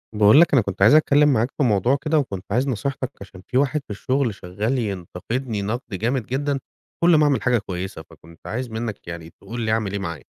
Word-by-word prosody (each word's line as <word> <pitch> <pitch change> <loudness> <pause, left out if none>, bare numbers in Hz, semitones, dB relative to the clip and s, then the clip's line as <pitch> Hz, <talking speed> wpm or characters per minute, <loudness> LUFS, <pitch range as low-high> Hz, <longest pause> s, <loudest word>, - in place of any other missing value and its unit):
باقول 105 +8 +7
لك 170 - +3
أنا 130 - +6
كنت 100 -2 -6
عايز 110 +6 +7
أتكلّم 150 -1 +5
معاك 120 +2 +1
في 145 - +2
موضوع 120 +3 +3
كده 155 0 +2
وكنت 100 -9 -4
عايز 125 +6 +1
نصيحتك 130 +1 -3
عشان 95 -1 -11
في 125 - -1
واحد 145 +2 +1
في - - -62
الشُغل 125 +3 -1
شغّال 100 +8 -3
ينتقدني 105 +3 -3
نَقْد 110 +5 -2
جامد 120 +4 -1
جدًا 140 +3 -1 0.4
كل 170 -1 +6
ما 155 - +5
أعمل 145 -2 +2
حاجة 125 -1 +2
كويسة، 95 -4 -5
فكنت 85 0 -17
عايز 125 +2 -3
منّك 110 -3 -5
يعني 85 -1 -7
تقول 120 +7 -8
لي 110 -1 0
أعمل 110 -3 0
إيه 100 - -3
معاه؟ 85 -6 -5
115 Hz, 215 wpm, -22 LUFS, 100-135 Hz, 0.4 s, باقول